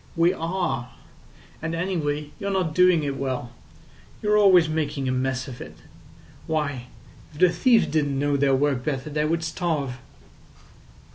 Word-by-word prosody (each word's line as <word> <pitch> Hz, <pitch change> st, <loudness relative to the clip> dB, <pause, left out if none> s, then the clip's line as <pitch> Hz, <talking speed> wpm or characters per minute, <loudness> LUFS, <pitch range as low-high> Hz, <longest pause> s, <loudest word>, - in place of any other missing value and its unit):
We 170 Hz, +1 st, +3 dB
are. 165 Hz, -8 st, -3 dB, 0.7 s
And 165 Hz, +1 st, -3 dB
anyway, 150 Hz, -5 st, -2 dB
you're 200 Hz, -, -3 dB
not 185 Hz, -5 st, 0 dB
doing 180 Hz, -2 st, +4 dB
it 140 Hz, -1 st, -2 dB
well. 130 Hz, -3 st, -3 dB, 0.7 s
You're 210 Hz, 0 st, +3 dB
always 190 Hz, -5 st, +6 dB
making 150 Hz, -3 st, -2 dB
a -, -, +1 dB
mess 130 Hz, +1 st, -1 dB
of 125 Hz, -2 st, -9 dB
it. 80 Hz, +1 st, -10 dB, 0.7 s
Why, 145 Hz, -6 st, -2 dB, 0.4 s
if 150 Hz, -, -13 dB
the 185 Hz, -, +6 dB
thieves 225 Hz, +7 st, +4 dB
didn't 145 Hz, -3 st, 0 dB
know 145 Hz, +1 st, +1 dB
their 140 Hz, -1 st, +3 dB
work 135 Hz, -2 st, 0 dB
better 145 Hz, 0 st, -3 dB
they 150 Hz, +1 st, 0 dB
would 165 Hz, +1 st, 0 dB
starve." 155 Hz, -6 st, -2 dB
150 Hz, 150 wpm, -24 LUFS, 135-170 Hz, 0.7 s, always